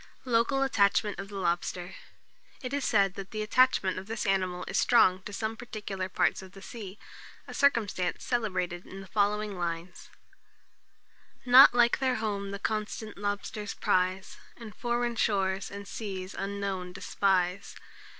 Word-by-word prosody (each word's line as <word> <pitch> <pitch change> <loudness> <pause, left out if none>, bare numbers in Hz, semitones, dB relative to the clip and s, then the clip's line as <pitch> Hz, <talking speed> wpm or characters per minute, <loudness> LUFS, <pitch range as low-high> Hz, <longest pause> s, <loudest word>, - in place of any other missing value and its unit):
LOCAL 250 +3 +2
ATTACHMENT 205 -5 +2
OF 195 - -5
THE 205 - -9
LOBSTER. 175 -1 -2 0.7
It 250 0 -6
is 285 -1 -1
said 200 -4 +3
that 195 -1 -8
the 215 -1 -3
attachment 215 -5 +3
of 190 - -11
this 225 0 -3
animal 185 -2 0
is - - 0
strong 190 -6 +4
to - - -6
some 220 +2 -3
particular 205 -5 -5
parts 185 - +1
of 190 0 -13
the 195 - -12
sea, 205 -4 -8 0.5
a - - -8
circumstance 215 -10 +1
celebrated 185 -7 -2
in 195 +1 -9
the - - -10
following 205 0 0
lines: 170 +1 -5 1.4
"Nought 250 0 +9
like 240 -1 +4
their 260 -1 +1
home 205 -3 -2
the 200 - -4
constant 215 +1 -3
lobsters 205 +1 -4
prize, 185 +1 0 0.2
And 225 -3 -10
foreign 240 -1 -1
shores 195 -3 0
and 200 0 -8
seas 190 -4 -6
unknown 195 -2 -4
despise. 190 -1 0
200 Hz, 150 wpm, -29 LUFS, 190-225 Hz, 1.4 s, Nought